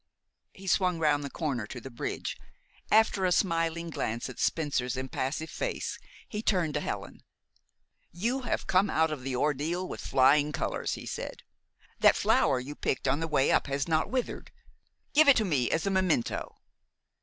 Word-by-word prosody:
He 195 - -13
swung 180 -1 +2
round 150 -2 +2
the 140 - -4
corner 135 -11 -3
to 120 - -7
the 135 +2 -9
bridge. 120 - -4 0.5
After 215 -3 +4
a 180 - +2
smiling 170 -2 0
glance 115 -3 -3
at - - -13
Spencer's 135 -6 0
impassive 130 +4 -3
face, - - -3 0.3
he 210 - -4
turned 180 -8 +1
to 150 - 0
Helen. - - -5 0.9
"You 235 +10 -1
have 245 - -2
come 195 +2 +3
out 160 0 +2
of 150 -4 -4
the 130 0 -3
ordeal 150 +7 0
with - - -6
flying 145 +3 +4
colors," - - -2
he - - -9
said. - - -6 0.6
"That - - +6
flower 130 - +3
you 135 +4 -6
picked 140 - -2
on 135 +3 +2
the 165 - -2
way 135 -4 +2
up - - +2
has 140 +1 -1
not 160 -1 +1
withered. 255 -2 -3 0.6
Give 305 +1 +6
it 275 - +7
to 220 - +2
me 140 -9 +1
as 165 - 0
a 195 - +1
memento." 185 -10 0
160 Hz, 175 wpm, -29 LUFS, 135-185 Hz, 0.9 s, it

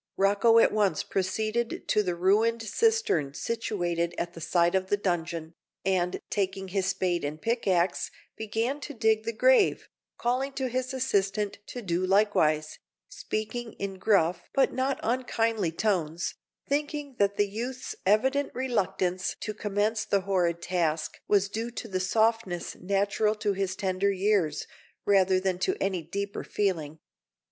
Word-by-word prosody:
Rocco 205 +4 +4
at 230 - +6
once 200 -6 +1
proceeded 215 +5 -2
to 210 - +4
the 180 -4 -1
ruined 220 +6 +2
cistern 440 - +1
situated 175 -7 -2
at 170 0 -3
one 165 - -9
side 170 +2 +2
of 190 0 +1
the 205 - +2
dungeon, 170 -4 -2 0.3
and, 180 -2 +1
taking 195 -1 -1
his 190 0 0
spade 185 -3 0
and 150 +2 -3
pickaxe, 190 -5 +1 0.3
began 225 +6 -2
to 290 -1 -7
dig 220 -1 +2
the 230 - 0
grave, 480 - +3 0.3
calling 255 +3 0
to 265 -1 -2
his 255 +1 -2
assistant 205 -6 0
to 245 - -7
do 175 -1 0
likewise, 185 -6 +2 0.3
speaking 230 - -4
in 195 -1 -5
gruff 180 -5 +2
but 275 - +3
not 260 +1 0
unkindly 225 -6 0
tones, 170 -3 -1 0.3
thinking 290 -1 -2
that 200 0 +2
the 205 - +3
youth's 240 +5 -5
evident 265 +8 +2
reluctance 190 -7 -1
to 215 - -4
commence 210 +1 0
the 200 -2 +1
horrid 175 -3 0
task 165 -4 -1
was 200 -1 +3
due 225 +4 -3
to 240 -1 -6
the 185 -3 -2
softness 220 -2 0
natural 200 +3 +1
to 210 -1 0
his 190 -1 -2
tender 190 0 0
years, 190 -6 +1 0.4
rather 190 -2 +4
than 185 -1 -1
to 380 - 0
any 190 -3 0
deeper 200 +5 -4
feeling. 165 -7 -1
200 Hz, 145 wpm, -28 LUFS, 185-230 Hz, 0.4 s, at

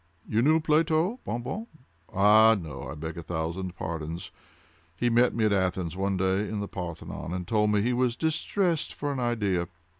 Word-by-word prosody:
You 110 - +1
knew 155 +5 +4
Plato, 160 +7 +2
Bon 120 0 -3
Bon?—ah, 110 - +2
no, 80 -4 -7
I - - -6
beg 80 +2 -6
a - - -5
thousand 85 +3 -4
pardons. 85 +1 -5 0.7
He 120 +6 +1
met 120 +2 +4
me 115 -2 +2
at 105 - +3
Athens, 90 -3 0
one 95 0 0
day, 95 +2 +1
in 105 - -3
the 100 - -3
Parthenon, 85 -2 -6
and 90 -1 -5
told 105 0 +2
me 105 -1 +2
he 125 +2 +1
was 125 -1 +1
distressed 165 +2 0
for 145 0 -2
an 135 - -3
idea. 105 -8 0
105 Hz, 180 wpm, -27 LUFS, 90-125 Hz, 0.7 s, knew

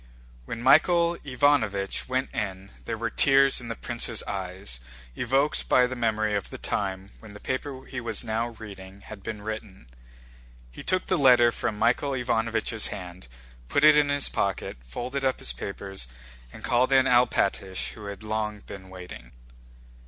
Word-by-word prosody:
When 115 - -5
Michael 170 +5 +5
Ivánovich 125 -8 +1
went 130 +1 -1
in 100 -3 -4
there - - -3
were - - -2
tears 135 -1 +4
in 120 - -8
the 115 - -4
prince's 120 -2 -2
eyes 95 -7 -5 0.4
evoked 135 - 0
by 125 - +6
the 125 +1 -3
memory 110 -3 0
of 100 -2 -2
the - - -7
time 95 -1 -3
when 110 -2 -12
the 105 - -10
paper 130 +2 -4
he 125 -2 -5
was 115 -2 -1
now 115 0 -1
reading 100 -4 -11
had 105 0 -10
been 105 0 -6
written. 110 - -6 0.9
He - - -10
took 185 0 0
the 185 - +1
letter 125 -3 +6
from 105 - -3
Michael 135 +5 +2
Ivánovich's 115 -3 0
hand, 90 -5 -8 0.4
put 140 - +2
it 155 0 +9
in 150 -1 +4
his 145 -1 +2
pocket, - - -2
folded 125 - -4
up 130 -1 +1
his - - 0
papers, 95 +3 -5 0.4
and - - -12
called 125 +2 +2
in 135 -1 +5
Alpátych 115 -6 +2
who 105 - -10
had 100 0 -7
long 105 -1 -2
been 95 -2 -10
waiting. 90 -10 -10
110 Hz, 165 wpm, -27 LUFS, 100-130 Hz, 0.9 s, it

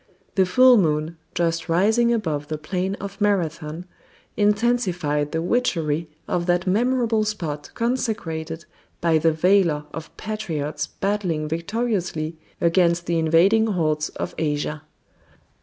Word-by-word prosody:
The 190 -2 +3
full 255 +6 +6
moon, 155 -2 0 0.2
just 170 0 0
rising 220 +8 +3
above 155 -11 -1
the 155 - -3
plain 185 +5 -2
of 200 +1 -8
Marathon, 170 -4 -1 0.5
intensified 200 -9 +1
the 160 0 -1
witchery 165 -8 0 0.2
of 175 0 -1
that 175 0 +2
memorable 230 +2 +2
spot 165 -9 -4
consecrated 190 -10 -2 0.3
by 165 -2 +3
the 165 +1 +3
valor 165 -2 +2
of 160 -1 -8
patriots 155 -9 -3
battling 185 -6 -2
victoriously 170 -2 -2 0.2
against 170 0 +2
the 170 -1 0
invading 180 +8 +4
hordes 155 -6 0
of - - -5
Asia. 150 -1 -1
175 Hz, 120 wpm, -23 LUFS, 155-210 Hz, 0.5 s, full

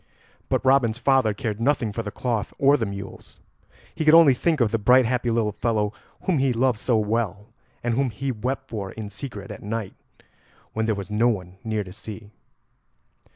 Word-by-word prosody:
But - - 0
Robin's 130 -4 +4
father 130 -5 +3
cared 110 0 -4
nothing 120 -4 +1
for 115 - -2
the 105 - -5
cloth 115 -1 -3
or 140 +1 +5
the 115 -7 -1
mules; 100 0 -9 0.6
he - - -2
could 155 +1 +7
only 165 -5 +8
think 155 +4 0
of 115 -4 +2
the 115 - 0
bright 125 +4 +5
happy 120 +1 0
little 115 -2 +1
fellow 105 -1 -1 0.3
whom 175 -6 +1
he 135 -1 +2
loved 120 -1 +1
so 120 -1 +1
well, 105 -1 -1 0.3
and 120 -1 0
whom 135 +2 +1
he 130 +5 -3
wept 130 +4 -3
for 100 -5 -5
in 105 -2 -7
secret 105 -3 -7
at - - -9
night 105 -1 -4 0.8
when 110 0 -1
there 110 - +1
was 100 +1 -7
no 110 +3 +3
one 95 -5 -2
near 110 -2 -1
to 90 -1 -11
see. 105 0 -10
115 Hz, 195 wpm, -24 LUFS, 105-130 Hz, 0.8 s, only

